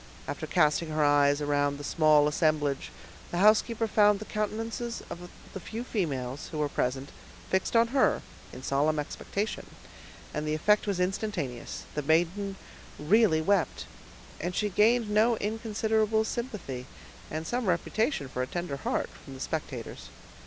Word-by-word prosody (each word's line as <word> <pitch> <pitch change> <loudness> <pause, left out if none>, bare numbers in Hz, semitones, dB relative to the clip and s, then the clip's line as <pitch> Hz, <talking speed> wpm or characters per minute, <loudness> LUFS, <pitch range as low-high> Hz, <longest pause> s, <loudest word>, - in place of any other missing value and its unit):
After - - -4
casting 160 -1 +2
her 155 -1 +1
eyes 145 0 +4
around 145 -1 +1
the 145 - -8
small 150 -1 +4
assemblage, 150 -2 0 0.4
the 175 - -3
housekeeper 215 +3 +4
found 210 -1 +4
the 215 - -8
countenances 225 +3 -3
of 175 +1 -7 0.2
the 190 - -5
few 225 +6 -6
females, 145 - -3
who 155 - -5
were 150 -1 +1
present, 130 +1 -2 0.4
fixed 190 +4 0
on 230 0 +5
her 270 +1 +2 0.3
in 125 - -10
solemn 145 +4 +1
expectation, 200 +8 -3 0.7
and 150 0 -3
the 155 - +1
effect 210 +7 +3
was 195 -3 0
instantaneous; 180 - -3
the 150 - -1
maiden 175 +6 +1 0.4
really 170 0 +4
wept, 195 0 +1 0.5
and 175 +3 -3
she 210 - +1
gained 225 +4 +3
no 215 +3 +3
inconsiderable 220 0 0
sympathy, 210 - -5 0.4
and 155 +1 -4
some 240 +3 -2
reputation 185 - 0
for 125 -1 -4
a 130 - -1
tender 175 -4 -4
heart, - - -1 0.2
from 135 - -10
the - - -10
spectators. 135 -5 -5
175 Hz, 150 wpm, -29 LUFS, 145-215 Hz, 0.7 s, on